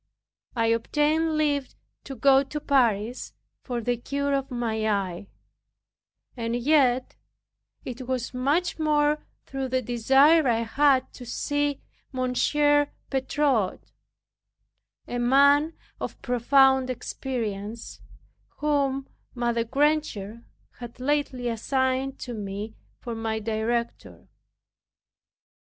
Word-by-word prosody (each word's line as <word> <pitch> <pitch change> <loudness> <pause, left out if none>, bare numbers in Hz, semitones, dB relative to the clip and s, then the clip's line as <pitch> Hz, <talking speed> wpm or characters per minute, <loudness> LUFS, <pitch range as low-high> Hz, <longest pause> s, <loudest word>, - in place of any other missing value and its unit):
I 230 -1 +1
obtained 305 +6 +1
leave 290 -3 0 0.3
to 270 - -7
go 270 +3 +5
to 300 +2 -5
Paris 240 -5 +1 0.3
for 245 -2 -4
the 245 +2 -1
cure 280 +3 -2
of 275 -1 -1
my 225 -3 -1
eye; 195 -2 -2 1.1
and 230 -1 -2
yet 255 -1 +2 0.7
it 250 0 -7
was 255 -1 -2
much 290 +8 0
more 300 -1 +2 0.2
through 270 -1 -4
the 255 0 -1
desire 270 +7 +4
I 230 -1 +2
had 265 +3 +2
to 250 - -10
see 290 +3 -1 0.3
Monsieur 290 +3 +2 0.2
Bertot, 265 -6 0 1.2
a 245 - -3
man 280 +5 +4 0.2
of - - -5
profound 265 +1 +4
experience, 230 -4 -5 0.6
whom 280 -2 0 0.3
Mother 235 -1 0
Granger 235 -5 -1 0.4
had 240 0 -9
lately 260 -2 -1
assigned 260 +3 -1
to 245 - -5
me 210 0 -5 0.2
for 235 - -6
my 225 -1 -2
director. 225 +2 -3
255 Hz, 105 wpm, -26 LUFS, 235-285 Hz, 1.2 s, go